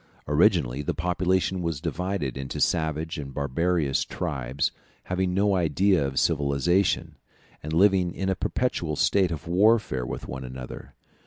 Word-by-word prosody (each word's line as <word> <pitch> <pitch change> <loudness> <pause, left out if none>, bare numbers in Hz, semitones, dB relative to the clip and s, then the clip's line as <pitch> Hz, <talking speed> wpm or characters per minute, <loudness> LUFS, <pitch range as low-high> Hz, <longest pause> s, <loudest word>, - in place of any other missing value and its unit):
Originally 60 +3 +3
the 75 - -2
population 90 +1 0
was 85 -4 -2
divided 90 -7 -3
into 65 0 -5
savage 80 -1 0
and 70 -2 -7
barbarous 75 +1 0
tribes, 65 +1 -2 0.3
having 90 0 -1
no 100 +2 +2
idea 90 +1 +2
of 70 -1 -1
civilization, 75 +7 +1 0.4
and 75 - -6
living 90 +1 +3
in 95 +2 -4
a 95 - +2
perpetual 85 -7 -1
state 95 +4 +3
of 80 -3 -6
warfare 95 - +3
with - - -6
one 65 0 -6
another. 65 0 -9
85 Hz, 140 wpm, -26 LUFS, 70-95 Hz, 0.4 s, Originally